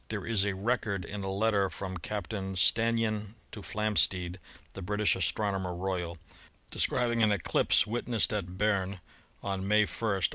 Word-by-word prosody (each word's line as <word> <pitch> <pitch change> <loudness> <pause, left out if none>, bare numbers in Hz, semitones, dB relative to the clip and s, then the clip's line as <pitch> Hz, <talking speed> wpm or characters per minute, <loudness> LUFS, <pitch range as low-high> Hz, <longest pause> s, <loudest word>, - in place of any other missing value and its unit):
There 110 -3 -3
is 105 -4 +1
a 100 -1 -1
record 100 -2 -1
in 100 -1 -5
a 95 - -2
letter 100 0 +2
from 95 -1 -5
Captain 95 +1 -4
Stannyan 110 +2 +1 0.2
to 105 - -8
Flamsteed, 95 -4 0 0.4
the 95 - -7
British 105 +3 +1
Astronomer 95 -1 0
Royal, 90 -2 -3 0.5
describing 120 -2 +1
an 110 -1 +5
eclipse 100 0 +3
wit 115 +3 -3
nessed 115 -3 +2
at 90 -3 -4
Berne 100 -2 0 0.4
on 95 -1 -2
May 105 +1 +5
1 110 0 -1
(O. 95 - -3
100 Hz, 155 wpm, -30 LUFS, 95-110 Hz, 0.5 s, an